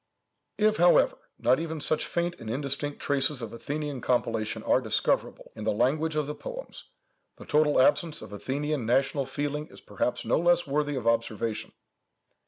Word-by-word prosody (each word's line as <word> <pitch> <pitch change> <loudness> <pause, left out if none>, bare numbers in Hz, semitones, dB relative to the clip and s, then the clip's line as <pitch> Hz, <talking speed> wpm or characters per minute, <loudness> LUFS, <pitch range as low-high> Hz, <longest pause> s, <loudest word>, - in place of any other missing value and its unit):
"If, 215 0 +3
however, 175 0 +5 0.2
not 130 +3 +3
even 160 -1 -4
such 150 +1 +1
faint 175 0 -1
and 110 - -7
indistinct 140 +3 -2
traces 140 0 +1
of 115 - -6
Athenian 145 +2 -4
compilation 115 -3 0
are - - +3
discoverable - - -1
in 110 - -7
the 110 - +1
language 150 +8 +1
of 150 -1 +1
the 150 - -4
poems, - - -8 0.5
the - - -12
total 150 -2 +3
absence 155 +4 +2
of 105 - -10
Athenian 135 +4 -2
national 135 +2 +1
feeling 145 +2 -3
is - - -14
perhaps 125 - -2
no - - +2
less 175 +1 +3
worthy 145 0 0
of 125 -3 -4
observation. 115 -1 0
145 Hz, 165 wpm, -28 LUFS, 120-155 Hz, 0.5 s, however